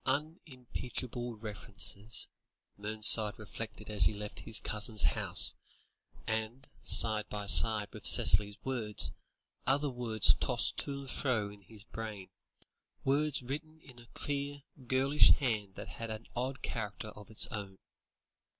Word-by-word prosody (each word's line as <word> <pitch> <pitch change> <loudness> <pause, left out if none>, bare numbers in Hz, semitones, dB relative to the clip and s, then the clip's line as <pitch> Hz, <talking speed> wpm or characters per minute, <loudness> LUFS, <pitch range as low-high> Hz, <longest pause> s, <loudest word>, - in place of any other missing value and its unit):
"Unimpeachable 130 -4 -5
references," 105 0 -6 0.5
Mernside 105 0 +4
reflected 110 0 -9
as 105 -5 +5
he 80 - +3
left 105 0 -8
his 110 - 0
cousin's 105 0 +1
house; 70 - +3 0.7
and, 110 +4 -4
side 110 -1 +5
by 105 -1 -5
side 105 +1 +6
with - - -4
Cicely's 105 +2 +3
words, 115 -6 +1 0.5
other 140 +2 +1
words 115 -4 +3
tossed - - +2
to 140 -1 -3
and 135 - -8
fro 110 -7 -2
in 105 0 -16
his 105 +2 -11
brain, 105 -5 -9 0.7
words 140 0 0
written 155 +5 -7
in 130 -5 -17
a 120 - -17
clear, 145 0 -4 0.2
girlish 135 +3 +4
hand 110 -8 -3
that - - -9
had 115 0 -8
an 110 +1 -7
odd 130 +2 -4
character 105 -1 -5
of 105 0 -13
its 110 - +2
own. 100 -4 -7
110 Hz, 130 wpm, -31 LUFS, 105-130 Hz, 0.7 s, side